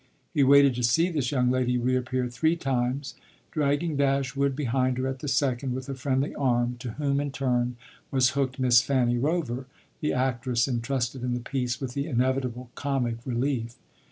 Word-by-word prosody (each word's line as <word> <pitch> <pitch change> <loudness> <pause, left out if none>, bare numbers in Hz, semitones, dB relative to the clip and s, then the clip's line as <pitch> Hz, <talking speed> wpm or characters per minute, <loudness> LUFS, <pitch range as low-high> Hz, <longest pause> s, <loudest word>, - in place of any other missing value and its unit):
He 150 - +2
waited 140 0 +6
to 120 0 -3
see 160 +10 +3
this 140 -7 -1
young 125 -3 +2
lady 125 -1 +1
reappear 125 +1 0
three 160 +7 +1
times, 135 -2 -1 0.4
dragging 150 +1 0
Dashwood 140 0 +1
behind 130 -2 0
her 130 - -1
at 130 0 -3
the 145 - -6
second 130 -2 0
with 130 0 -5
a - - -2
friendly 135 +1 -1
arm, 120 -2 0
to 120 -2 -6
whom, 140 0 0
in 145 0 -1
turn, 125 -3 0 0.3
was 130 -2 +3
hooked 135 -2 -1
Miss 125 -2 +5
Fanny 120 -1 +1
Rover, 135 -4 -1 0.3
the 150 - 0
actress 125 -1 0
entrusted 125 0 -2
in 125 -1 0
the - - -2
piece 125 0 -2
with 130 -3 -4
the 140 +3 -2
inevitable 125 -2 -1
comic 130 -5 -1
relief. 120 -1 -1
130 Hz, 175 wpm, -27 LUFS, 125-140 Hz, 0.4 s, waited